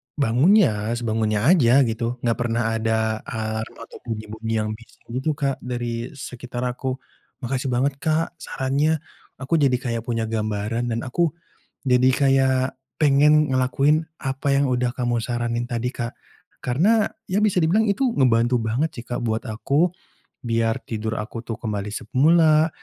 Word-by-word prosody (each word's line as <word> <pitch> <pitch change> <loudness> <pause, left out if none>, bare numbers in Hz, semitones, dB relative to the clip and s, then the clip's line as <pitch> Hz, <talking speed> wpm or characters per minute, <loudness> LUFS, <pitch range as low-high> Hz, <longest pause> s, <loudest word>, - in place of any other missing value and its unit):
bangunnya 125 - +3
sebangunnya 110 -3 0
aja 135 -6 +5
gitu. 115 0 -2
Enggak 115 -1 +1
pernah 115 0 0
ada 110 0 0
alarm 110 0 -4
atau - - -12
bunyi-bunyi 110 0 -4
yang 110 - -3
bisa 115 +2 -12
gitu, 130 +5 -1
Kak, 140 -2 -1
dari 120 +1 -4
sekitar 125 -2 -6
aku. 130 +1 -2 0.5
Makasih 130 +2 -2
banget, 135 +2 0
Kak, 160 +3 -1
sarannya 145 +4 0 0.3
aku 140 +5 0
jadi 135 -3 +3
kayak 120 -2 -3
punya 115 -2 -1
gambaran 110 +2 -2
dan 115 0 -2
aku 160 +5 0 0.5
jadi 125 0 +5
kayak 130 -1 +2 0.2
pengen 150 +1 +5
ngelakuin 140 +5 +2 0.2
apa 140 0 0
yang 140 - +2
udah 125 -1 0
kamu 120 -2 -1
saranin 120 0 -2
tadi, 120 +1 -1
Kak. 120 -1 -3 0.5
Karena 195 - +2 0.2
ya 195 - +2
bisa 205 -5 +2
dibilang 210 +8 +3
itu 240 +6 +1
ngebantu 120 - +3
banget 115 +8 -1
sih, 120 - -9
Kak, 120 0 -3
buat 110 +1 -2
aku 140 +9 +1 0.6
biar 115 -1 +1
tidur 110 0 -3
aku 110 +2 -5
tuh 115 -1 -6
kembali 105 -3 -4
semula 155 +8 +3
125 Hz, 145 wpm, -23 LUFS, 115-140 Hz, 0.6 s, aja